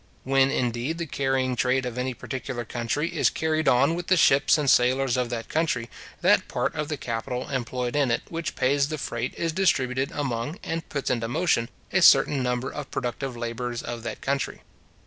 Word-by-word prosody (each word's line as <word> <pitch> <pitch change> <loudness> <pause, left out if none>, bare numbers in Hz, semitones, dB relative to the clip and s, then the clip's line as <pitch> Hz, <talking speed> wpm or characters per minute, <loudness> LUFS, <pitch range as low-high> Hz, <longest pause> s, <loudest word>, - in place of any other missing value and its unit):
When, 135 0 +3
indeed, 125 +4 -1
the 170 - -3
carrying 135 -3 0
trade 125 +1 +1
of 125 -2 -4
any 125 0 -2
particular 125 -2 -5
country 120 +8 -2
is - - +3
carried 160 0 -1
on 135 +6 +4
with 175 0 -4
the 185 - +4
ships 140 -1 +5
and 150 -2 -1
sailors 130 0 +3
of 125 -2 0
that 115 -1 -4
country, 140 -8 -1 0.3
that - - +4
part - - -1
of 150 0 -3
the 150 -1 -3
capital 125 +1 -4
employed 125 -1 -2
in 145 -3 +2
it 115 - 0
which 165 -1 -4
pays 140 +2 +2
the 155 - -3
freight 120 -3 -3
is 165 -1 -1
distributed 135 -7 +1
among, 140 +2 -3
and 165 0 -4
puts 140 -2 -2
into 115 -2 -1
motion, 120 -3 +1 0.2
a - - +3
certain 140 -2 +6
number 125 +1 -1
of 150 -2 -6
productive 125 0 -3
labourers 120 +1 -4
of 120 -1 -5
that 115 - -6
country. 140 0 -2
130 Hz, 190 wpm, -25 LUFS, 120-145 Hz, 0.3 s, certain